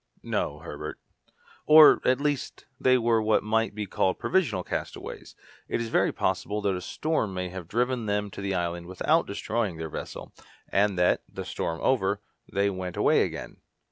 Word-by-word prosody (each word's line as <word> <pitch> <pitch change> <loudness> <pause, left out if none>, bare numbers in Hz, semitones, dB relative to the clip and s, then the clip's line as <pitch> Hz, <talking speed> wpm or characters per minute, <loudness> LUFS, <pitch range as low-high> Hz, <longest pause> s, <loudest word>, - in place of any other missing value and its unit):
"No, - - -2
Herbert; - - -7 0.7
or, 155 0 +9
at 130 +1 +3
least, 145 -1 -2
they 130 0 +4
were 115 -2 +2
what 110 0 +2
might 110 0 0
be 105 -1 -3
called 95 -1 0
provisional 115 - +1
castaways. - - -6 0.3
It - - -1
is 115 -1 -3
very - - +2
possible 105 +1 -1
that 100 - +2
a 90 - -4
storm 115 - -1
may 90 0 -3
have 90 -2 -8
driven 120 +2 0
them 105 0 -1
to - - -7
the 100 -1 -1
island 85 -1 -2
without 155 - +1
destroying 105 -2 -2
their 80 0 -5
vessel, - - -7 0.3
and 100 -1 +1
that, 90 0 +3
the - - -6
storm 80 0 -3
over, 100 -6 +2 0.3
they 100 0 +2
went 90 -2 -5
away - - +4
again." - - -4
105 Hz, 170 wpm, -27 LUFS, 95-120 Hz, 0.7 s, or